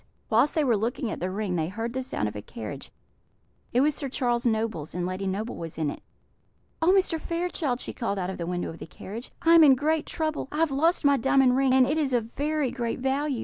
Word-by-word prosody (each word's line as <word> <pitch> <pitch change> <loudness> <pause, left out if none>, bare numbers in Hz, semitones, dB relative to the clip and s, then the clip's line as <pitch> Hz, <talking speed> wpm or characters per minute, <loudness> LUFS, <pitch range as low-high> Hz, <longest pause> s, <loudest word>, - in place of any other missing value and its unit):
Whilst 235 +7 +3
they 310 - +3
were 245 -5 +3
looking 225 +2 -2
at - - -5
the 180 - -2
ring 195 -1 -2
they 160 -1 0
heard 225 +5 -4
the 260 - -2
sound 255 - -2
of 105 - -6
a 105 - -5
carriage; 105 +1 -8 0.8
it 245 - +3
was 300 +2 +3
Sir 280 -1 -5
Charles 245 -2 0
Noble's, 220 -9 -1
and 180 -1 -1
Lady 185 +2 -3
Noble 210 +5 -3
was 165 -1 -7
in 155 -3 0
it. - - -9 0.8
"Oh, 330 +3 +5
Mr. 375 -4 +2
Fairchild!" 335 -7 -2
she - - -4
called 215 -4 -2
out 185 0 -2
of 190 - -8
the 170 - -3
window 175 -1 -2
of 165 - -11
the - - -8
carriage, 220 +8 -8
"I 330 - +6
am 335 -1 +9
in 275 -3 +7
great 310 +3 0
trouble; 310 -3 -2
I 300 - -4
have 325 -2 +2
lost 320 +4 +2
my 280 -1 +5
diamond 265 0 +4
ring, 265 -1 +3
and 260 -1 +6
it 300 +4 0
is 280 -4 0
of 230 -1 -1
very 295 -2 0
great 240 -3 -2
value. 270 0 -1
250 Hz, 245 wpm, -26 LUFS, 200-295 Hz, 0.8 s, am